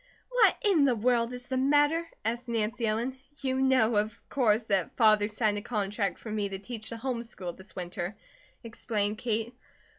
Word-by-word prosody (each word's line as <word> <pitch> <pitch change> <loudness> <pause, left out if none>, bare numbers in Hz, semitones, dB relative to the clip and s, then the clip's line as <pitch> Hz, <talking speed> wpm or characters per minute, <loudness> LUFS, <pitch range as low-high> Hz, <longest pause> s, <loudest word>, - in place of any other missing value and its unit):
"What - - +4
in 370 -9 +4
the 255 -3 +3
world 235 +1 +2
is 250 0 -6
the 260 0 -2
matter?" 290 +5 +3 0.2
asked 240 +2 -2
Nancy 230 +1 -1
Ellen. 235 +5 -1 0.2
"You 260 0 0
know, 255 -5 +3
of 215 +2 -1
course, 225 -4 +2
that 195 -5 0
Father 215 -3 +5
signed 210 -1 0
a - - -9
contract 205 -2 -1
for 220 - -8
me 210 -2 -1
to 195 - -4
teach 220 +2 -7
the 230 - -5
home 245 0 -2
school 185 -7 -7
this 190 -1 -14
winter," 180 +2 -4 0.5
explained 215 -2 -2
Kate. 230 -1 -1
225 Hz, 180 wpm, -29 LUFS, 210-250 Hz, 0.5 s, Father